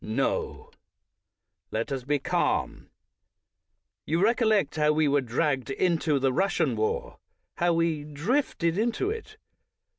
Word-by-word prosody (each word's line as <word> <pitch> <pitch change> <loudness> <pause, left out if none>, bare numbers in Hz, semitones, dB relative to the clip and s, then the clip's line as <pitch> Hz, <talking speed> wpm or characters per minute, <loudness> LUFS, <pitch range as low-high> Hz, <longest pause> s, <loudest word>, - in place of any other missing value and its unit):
No, 110 - -2 1.0
let 115 +5 -3
us 130 -2 -3
be 145 +1 +1
calm. - - -1 1.2
You 165 +2 +1
recollect 220 -1 +2
how 150 -1 +3
we 155 0 +2
were 140 0 +3
dragged 135 +2 -1
into 160 0 +1
the 135 -1 +1
Russian 195 +8 +1
war 475 +3 -2 0.2
— - - -52
how 175 0 +3
we 165 -3 0
"drifted" 170 - -1
into 240 - 0
it. 435 -1 -8
165 Hz, 125 wpm, -27 LUFS, 145-220 Hz, 1.2 s, how